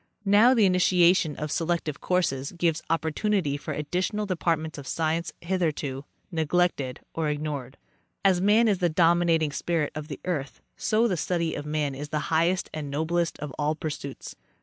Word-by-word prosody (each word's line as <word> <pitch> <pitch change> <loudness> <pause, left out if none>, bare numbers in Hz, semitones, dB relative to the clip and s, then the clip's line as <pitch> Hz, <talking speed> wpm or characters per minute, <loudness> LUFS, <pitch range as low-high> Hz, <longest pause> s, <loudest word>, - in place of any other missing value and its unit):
Now 215 +6 +6
the 220 -4 +5
initiation 180 -3 +4
of 150 -1 -4
selective 165 -3 -1
courses 150 -7 0
gives 170 -2 0
opportunity 165 0 0
for 145 - -5
additional 185 +8 -2
departments 165 -5 -1
of 135 - -9
science, 165 +1 -1
hitherto 155 -6 -2 0.3
neglected 160 -5 0
or 160 -2 -1
ignored. 145 -3 -4 0.5
As 185 -2 +4
man 215 +4 +4
is 200 -4 +2
the 175 - +2
dominating 165 -1 +3
spirit 160 +1 -1
of 155 -1 -6
the 145 -4 -7
earth, 150 -7 -3 0.2
so 220 +2 +2
the 185 -6 -1
study 170 -1 -1
of 145 0 -5
man 150 -2 -1
is 145 +2 -6
the 150 +1 -2
highest 170 +3 +2
and 150 -2 -4
noblest 165 +4 -1
of 150 -3 -5
all 150 +1 +1
pursuits. 145 -3 -6
165 Hz, 160 wpm, -26 LUFS, 150-180 Hz, 0.5 s, Now